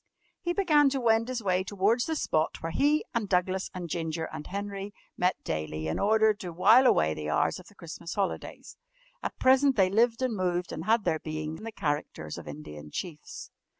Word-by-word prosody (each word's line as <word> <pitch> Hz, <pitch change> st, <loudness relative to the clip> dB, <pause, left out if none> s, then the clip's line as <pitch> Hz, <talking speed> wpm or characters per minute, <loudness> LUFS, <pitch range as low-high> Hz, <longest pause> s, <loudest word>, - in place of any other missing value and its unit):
He 345 Hz, -, -1 dB
began 310 Hz, -7 st, +4 dB
to 270 Hz, 0 st, -1 dB
wend 230 Hz, -1 st, +3 dB
his 250 Hz, -3 st, -3 dB
way 185 Hz, -1 st, +1 dB
towards 205 Hz, +5 st, +1 dB
the 320 Hz, -, -1 dB
spot 155 Hz, -, -1 dB
where 165 Hz, -, -2 dB
he, 295 Hz, -, +2 dB
and 220 Hz, -4 st, -1 dB
Douglas, 185 Hz, +1 st, 0 dB
and 180 Hz, -2 st, -6 dB
Ginger, 160 Hz, 0 st, -3 dB
and 150 Hz, -, -7 dB
Henry 200 Hz, +1 st, -5 dB, 0.2 s
met 180 Hz, +1 st, +1 dB
daily 80 Hz, 0 st, -3 dB
in 80 Hz, -, -2 dB
order 220 Hz, +1 st, +4 dB
to 185 Hz, -4 st, -7 dB
wile 220 Hz, +10 st, +6 dB
away 80 Hz, -, +3 dB
the 75 Hz, -1 st, -5 dB
hours 80 Hz, -, +1 dB
of 185 Hz, -, -14 dB
the 205 Hz, -, -18 dB
Christmas 170 Hz, -1 st, -8 dB
holidays. 200 Hz, -2 st, -4 dB, 0.4 s
At -, -, -4 dB
present 265 Hz, +1 st, +4 dB
they 190 Hz, -3 st, +3 dB
lived 230 Hz, +3 st, +2 dB
and 250 Hz, -3 st, 0 dB
moved 180 Hz, -2 st, -1 dB
and 160 Hz, -, -5 dB
had 225 Hz, +1 st, +3 dB
their 160 Hz, -, 0 dB
being 155 Hz, 0 st, -4 dB
in -, -, -12 dB
the 225 Hz, -, -5 dB
characters 145 Hz, -, -3 dB
of -, -, -12 dB
Indian 75 Hz, 0 st, -9 dB
Chiefs. 155 Hz, -, -7 dB
190 Hz, 200 wpm, -28 LUFS, 160-230 Hz, 0.4 s, wile